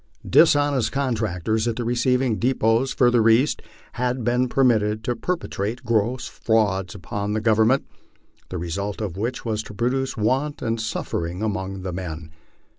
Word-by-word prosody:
Dishonest 145 -6 +4
contractors 110 -5 -1
at 115 - 0
the 120 - -3
receiving 125 0 +1
depots 120 0 +2
further 120 -3 +4
east 125 +7 +3 0.3
had 125 0 -2
been 125 +2 +1
per 135 - +2
mitted 110 -3 +2
to 120 - -1
perpetrate 120 - -3
gross 115 +2 0
frauds 100 -5 0
upon 100 +3 -4
the 110 - 0
Government, 110 +4 +3 0.6
the 90 - -4
result 95 +5 -3
of 105 -6 -4
which 120 +6 -3
was 110 -2 -1
to 105 - -11
produce 130 +4 -1
want 135 +7 0
and 115 -1 -1
suffering 90 -3 -3
among 95 -3 -3
the 95 -2 -4
men. 80 -3 -6
115 Hz, 150 wpm, -23 LUFS, 105-125 Hz, 0.6 s, Dishonest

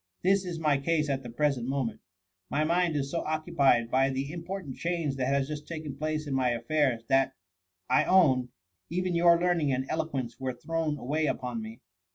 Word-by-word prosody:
This 195 +1 +3
is 175 -2 -4
my 150 -3 +2
case 150 0 +1
at 135 -1 -1
the 120 - -8
present 130 -1 0
moment. 135 -3 -2 0.5
My 145 +3 +1
mind 170 0 +2
is 140 -1 -1
so 170 - -1
occupied 145 -7 +2
by 135 +1 +3
the 135 +3 -3
im 170 - -5
portant 180 -7 -6
change 170 -5 -1
that 130 -1 0
has 140 0 +1
just 150 0 -6
taken 155 -4 -6
place 155 +1 -2
in 145 - -3
my 130 -2 +2
affairs, 125 -1 0
that, 135 0 +2 0.5
I 130 - +3
own, 130 -10 +4 0.4
even 180 +1 -1
your 170 0 +5
learning 170 -5 +2
and 130 0 0
elo 160 0 -1
quence 130 -5 -4
were 130 -1 -2
thrown 160 +3 -2
away 150 +4 -1
upon 125 -4 -2
me.' 110 +2 -9
145 Hz, 200 wpm, -29 LUFS, 130-165 Hz, 0.5 s, your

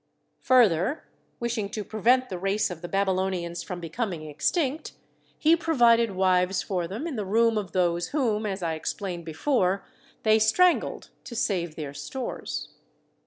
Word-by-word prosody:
Further, 240 - +3 0.4
wishing 235 -4 -2
to 210 0 -4
prevent 245 +5 +2
the 185 -3 -5
race 195 +2 0
of 170 -2 -7
the 175 - -5
Babylonians 185 -3 -1
from 180 -2 -6
becoming 170 -1 -4
extinct, 270 - -1 0.4
he 320 +2 +5
provided 240 - +3
wives 185 0 +2
for 180 -4 -2
them 210 - -5
in 310 -7 -4
the 210 - -1
room 225 +3 +2
of 205 -4 -3
those 175 -1 +1
whom 225 -7 0
(as 195 -2 -4
I 165 -1 0
ex 160 - -3
plained 180 -4 -5
before) 190 - 0 0.4
they 220 0 +5
strangled 345 +12 +2
to 235 - -8
save 175 -8 -1
their 145 -3 -6
stores. 190 - -5
200 Hz, 155 wpm, -26 LUFS, 175-235 Hz, 0.4 s, he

